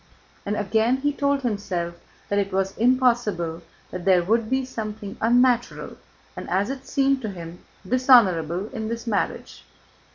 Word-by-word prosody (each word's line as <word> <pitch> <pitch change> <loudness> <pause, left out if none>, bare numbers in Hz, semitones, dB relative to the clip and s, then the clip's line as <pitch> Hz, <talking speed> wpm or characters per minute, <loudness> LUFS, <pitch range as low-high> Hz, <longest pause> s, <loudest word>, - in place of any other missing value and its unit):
and 210 +1 -1
again 220 +5 +1
he 290 +2 -1
told 280 -1 0
himself 190 -7 -2 0.3
that 205 - 0
it 200 0 -2
was 195 0 -1
impossible, 235 -9 +1 0.3
that 180 - -6
there 185 -2 +4
would 220 +4 +1
be 265 0 0
something 215 -4 -6
unnatural, 245 +1 +2 0.4
and - - -7
as 200 +6 0
it 270 -1 -8
seemed 275 -1 +1
to 220 - -3
him 175 -2 -9 0.3
dishonorable, 195 - +4
in 220 -4 -5
this 230 +1 -5
marriage. 215 -4 -3
220 Hz, 150 wpm, -24 LUFS, 190-255 Hz, 0.4 s, there